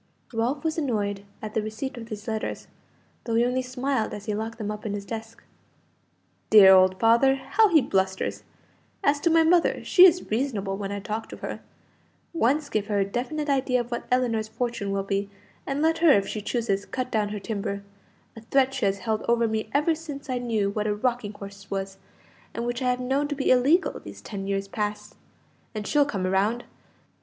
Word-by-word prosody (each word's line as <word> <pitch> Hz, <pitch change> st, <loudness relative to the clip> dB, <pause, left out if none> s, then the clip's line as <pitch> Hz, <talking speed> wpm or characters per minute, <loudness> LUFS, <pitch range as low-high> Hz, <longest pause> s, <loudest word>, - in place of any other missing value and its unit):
Ralph 245 Hz, +6 st, -1 dB
was 320 Hz, 0 st, -1 dB
annoyed 205 Hz, -8 st, -1 dB, 0.2 s
at 215 Hz, -1 st, -5 dB
the 220 Hz, -, +1 dB
receipt 220 Hz, +6 st, -5 dB
of 230 Hz, -2 st, -8 dB
these 215 Hz, -1 st, -8 dB
letters, 220 Hz, -1 st, -3 dB, 0.6 s
though 230 Hz, -, -1 dB
he 235 Hz, +1 st, +4 dB
only 250 Hz, +1 st, 0 dB
smiled 255 Hz, -1 st, -2 dB
as 205 Hz, -1 st, -9 dB
he 215 Hz, -, -2 dB
locked 220 Hz, +2 st, -4 dB
them 210 Hz, -2 st, -3 dB
up 210 Hz, 0 st, -7 dB
in 210 Hz, -, -3 dB
his 200 Hz, -1 st, -6 dB
desk. 225 Hz, +1 st, -7 dB, 1.1 s
"Dear 200 Hz, -3 st, +9 dB
old 185 Hz, 0 st, +5 dB
father! 235 Hz, +4 st, +5 dB
how 275 Hz, +12 st, +2 dB
he 320 Hz, -5 st, +5 dB
blusters! 190 Hz, 0 st, -1 dB, 0.6 s
As 285 Hz, 0 st, +3 dB
to 335 Hz, -, +2 dB
my 325 Hz, 0 st, +5 dB
mother, 340 Hz, +1 st, +3 dB
she 370 Hz, 0 st, +8 dB
is 355 Hz, -7 st, 0 dB
reasonable 215 Hz, -5 st, -1 dB
when 200 Hz, 0 st, -5 dB
I 200 Hz, -, -3 dB
talk 215 Hz, +2 st, -5 dB
to -, -, -8 dB
her. -, -, -6 dB, 0.7 s
Once 290 Hz, 0 st, +1 dB
give 215 Hz, -7 st, -2 dB
her 210 Hz, -2 st, 0 dB
a 195 Hz, -, +2 dB
definite 260 Hz, +9 st, -3 dB
idea 265 Hz, -2 st, +1 dB
of 240 Hz, 0 st, -5 dB
what 235 Hz, -, -4 dB
Ellinor's 235 Hz, -4 st, +1 dB
fortune 235 Hz, -2 st, -3 dB
will 195 Hz, 0 st, -1 dB
be, 195 Hz, 0 st, -2 dB, 0.4 s
and 280 Hz, +2 st, -1 dB
let 325 Hz, 0 st, +2 dB
her, 335 Hz, 0 st, +5 dB
if 200 Hz, -6 st, +3 dB
she 215 Hz, -, -4 dB
chooses, 210 Hz, -2 st, -1 dB
cut 255 Hz, -1 st, -4 dB
down 210 Hz, -2 st, 0 dB
her 210 Hz, 0 st, -4 dB
timber 200 Hz, -1 st, -4 dB, 0.5 s
a 225 Hz, -, -10 dB
threat 265 Hz, +3 st, +2 dB
she 260 Hz, -5 st, -1 dB
has 195 Hz, 0 st, 0 dB
held 220 Hz, -1 st, 0 dB
over 235 Hz, -1 st, +3 dB
me 220 Hz, 0 st, -2 dB
ever 300 Hz, +3 st, +2 dB
since 290 Hz, -4 st, -7 dB
I 250 Hz, -, -1 dB
knew 220 Hz, -5 st, 0 dB
what 210 Hz, +1 st, -2 dB
a 210 Hz, -, 0 dB
rocking 235 Hz, -2 st, -1 dB
horse 200 Hz, -1 st, -11 dB
was, 195 Hz, 0 st, -4 dB, 0.6 s
and 235 Hz, -, -3 dB
which 240 Hz, +1 st, -3 dB
I 250 Hz, -, +1 dB
have 250 Hz, 0 st, 0 dB
known 270 Hz, +3 st, 0 dB
to 290 Hz, -, -3 dB
be 270 Hz, -, +1 dB
illegal 280 Hz, +9 st, +3 dB
these -, -, -11 dB
ten 195 Hz, -2 st, -6 dB
years 195 Hz, 0 st, -1 dB
past 210 Hz, 0 st, -4 dB, 0.6 s
and 210 Hz, -1 st, -4 dB
she'll 290 Hz, +6 st, +3 dB
come 200 Hz, -10 st, -3 dB
round. 200 Hz, +6 st, +1 dB
225 Hz, 205 wpm, -25 LUFS, 205-265 Hz, 1.1 s, Dear